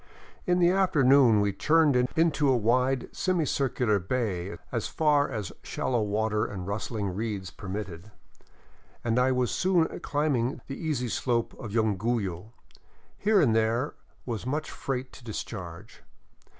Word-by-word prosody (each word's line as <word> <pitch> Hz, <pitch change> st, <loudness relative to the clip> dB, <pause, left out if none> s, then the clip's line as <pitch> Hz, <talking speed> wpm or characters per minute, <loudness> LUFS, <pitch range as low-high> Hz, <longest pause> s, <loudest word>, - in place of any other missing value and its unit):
In 180 Hz, 0 st, +3 dB
the 175 Hz, -1 st, +4 dB
afternoon 140 Hz, -, +5 dB
we 100 Hz, -1 st, +1 dB
churned 155 Hz, +1 st, +3 dB, 0.2 s
Into 160 Hz, -3 st, +3 dB
a 130 Hz, -, +4 dB
wide, 125 Hz, +3 st, +1 dB
semi 185 Hz, -3 st, +1 dB
cIrcular 125 Hz, -7 st, +1 dB
bay 95 Hz, -2 st, -2 dB
as 115 Hz, -4 st, -2 dB
far 150 Hz, -2 st, +2 dB
as 105 Hz, -9 st, -4 dB
shallow 120 Hz, -3 st, -1 dB
water 105 Hz, +1 st, 0 dB
and 95 Hz, -3 st, -5 dB
rustling 100 Hz, 0 st, -3 dB
reeds 100 Hz, -3 st, -4 dB
permitted, 95 Hz, -2 st, -6 dB, 0.9 s
and 120 Hz, +1 st, +1 dB
I 130 Hz, +1 st, +3 dB
was 125 Hz, -1 st, +1 dB
soon 180 Hz, -3 st, +1 dB
climbing 140 Hz, -4 st, 0 dB
the 135 Hz, -, -6 dB
easy 145 Hz, -6 st, -2 dB
slope 120 Hz, 0 st, 0 dB
to -, -, -9 dB
Yunguyo. 105 Hz, -2 st, -1 dB, 0.6 s
Here 210 Hz, 0 st, +3 dB
and 120 Hz, -10 st, +3 dB
there 115 Hz, +5 st, +1 dB, 0.3 s
was 115 Hz, -4 st, -4 dB
much 145 Hz, +5 st, -3 dB
freight 130 Hz, -1 st, -4 dB
to 130 Hz, -, -13 dB
dis 110 Hz, -3 st, -4 dB
charge. 85 Hz, -6 st, -9 dB
120 Hz, 140 wpm, -28 LUFS, 105-140 Hz, 0.9 s, afternoon